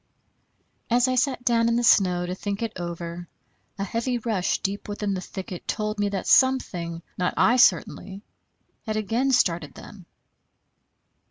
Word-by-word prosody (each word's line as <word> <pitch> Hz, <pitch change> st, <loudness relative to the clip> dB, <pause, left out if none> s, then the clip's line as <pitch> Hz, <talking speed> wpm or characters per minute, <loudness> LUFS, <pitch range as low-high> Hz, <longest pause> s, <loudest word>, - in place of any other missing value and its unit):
As 245 Hz, +1 st, +3 dB
I 255 Hz, -, +1 dB
sat 255 Hz, 0 st, 0 dB
down 230 Hz, -1 st, +3 dB
in 230 Hz, -, +1 dB
the 240 Hz, -, +1 dB
snow 180 Hz, -5 st, +4 dB
to 180 Hz, -, -4 dB
think 200 Hz, +3 st, -4 dB
it 225 Hz, -1 st, -3 dB
over, 170 Hz, 0 st, -6 dB, 0.5 s
a 195 Hz, -, -2 dB
heavy 235 Hz, +5 st, -2 dB
rush 215 Hz, -6 st, -1 dB
deep 200 Hz, +2 st, -4 dB
within 205 Hz, -1 st, -2 dB
the 185 Hz, -, -3 dB
thicket 185 Hz, -1 st, -8 dB
told 210 Hz, 0 st, -2 dB
me 205 Hz, 0 st, +1 dB
that 195 Hz, -2 st, -4 dB
something, 175 Hz, -11 st, +2 dB, 0.2 s
not 180 Hz, -, 0 dB
I 245 Hz, -, +4 dB
certainly, 200 Hz, -5 st, +2 dB, 0.6 s
had 215 Hz, -, -1 dB
again 230 Hz, +6 st, 0 dB
started 170 Hz, -, +1 dB
them. 185 Hz, -4 st, -13 dB
205 Hz, 155 wpm, -25 LUFS, 180-235 Hz, 0.6 s, snow